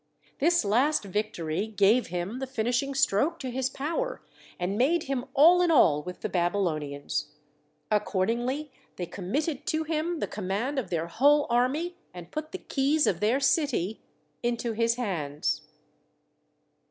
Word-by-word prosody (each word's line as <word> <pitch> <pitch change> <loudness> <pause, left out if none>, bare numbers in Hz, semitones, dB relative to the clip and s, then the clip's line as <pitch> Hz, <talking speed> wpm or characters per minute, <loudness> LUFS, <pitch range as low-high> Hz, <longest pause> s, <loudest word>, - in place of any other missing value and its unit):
This 340 -3 +3
last 250 +9 +2
victory 195 -3 -2
gave 215 +3 +3
him 180 +7 -4
the 265 - -4
finishing 250 +3 -1
stroke 275 +5 +2
to 260 -6 -5
his 260 +1 -1
power 335 - -3 0.4
and 180 +3 -1
made 300 +9 +2
him 270 -2 -2
all 335 +6 +7
in 355 - +3
all 160 - +5
with 180 +3 -8
the - - -1
Babylonians: 155 -5 -1 0.6
accordingly 235 +8 0 0.2
they 180 - -4
committed 275 - -3
to 315 0 0
him 325 +2 -1
the - - -1
command 210 +8 -2
of 220 -9 -5
their 165 -2 -1
whole 285 +11 +4
army, 290 +9 +1 0.2
and 175 -1 -10
put 310 0 -5
the 380 - -4
keys 295 -1 +1
of 170 - +1
their 225 +6 +2
city 275 - +1 0.4
into 235 0 -1
his 230 +1 +1
hands. 160 - -2
240 Hz, 145 wpm, -28 LUFS, 190-290 Hz, 0.6 s, all